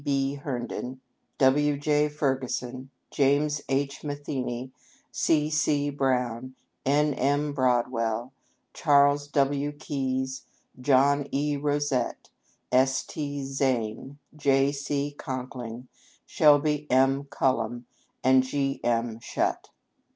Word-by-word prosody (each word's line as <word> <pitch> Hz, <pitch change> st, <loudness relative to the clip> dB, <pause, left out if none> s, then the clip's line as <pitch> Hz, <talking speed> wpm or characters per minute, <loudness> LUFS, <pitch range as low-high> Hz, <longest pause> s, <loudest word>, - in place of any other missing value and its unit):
B. 140 Hz, -1 st, 0 dB
Herndon, 130 Hz, -2 st, -5 dB, 0.4 s
W. 145 Hz, +2 st, +3 dB
J. 150 Hz, +1 st, +2 dB
Ferguson, 130 Hz, -3 st, -2 dB, 0.2 s
James 145 Hz, +2 st, +2 dB
H. 140 Hz, +1 st, -1 dB
Matheney, 130 Hz, -4 st, -4 dB, 0.4 s
C. 155 Hz, -1 st, +1 dB
C. 145 Hz, -2 st, +1 dB
Brown, 130 Hz, -2 st, -1 dB, 0.3 s
N. 145 Hz, +1 st, +3 dB
M. 145 Hz, +3 st, 0 dB
Broadwell, 120 Hz, -2 st, 0 dB, 0.4 s
Charles 145 Hz, -1 st, +3 dB
W. 145 Hz, 0 st, +1 dB
Keyes, 130 Hz, -3 st, -3 dB, 0.3 s
John 140 Hz, +2 st, +3 dB
E. 145 Hz, +1 st, 0 dB
Rosette, 145 Hz, -3 st, -1 dB, 0.4 s
S. 130 Hz, +1 st, +3 dB
T. 145 Hz, -2 st, -4 dB
Zane, 135 Hz, -1 st, -2 dB, 0.2 s
J. 140 Hz, -1 st, +3 dB
C. 145 Hz, 0 st, -2 dB
Conkling, 125 Hz, -3 st, -6 dB, 0.4 s
Shelby 150 Hz, 0 st, +3 dB
M. 135 Hz, +2 st, +3 dB
Cullom, 120 Hz, -3 st, -1 dB, 0.4 s
and 130 Hz, 0 st, +6 dB
G. 135 Hz, +1 st, -2 dB
M. 115 Hz, -1 st, 0 dB
Shutt. -, -, -2 dB
135 Hz, 100 wpm, -27 LUFS, 130-145 Hz, 0.4 s, and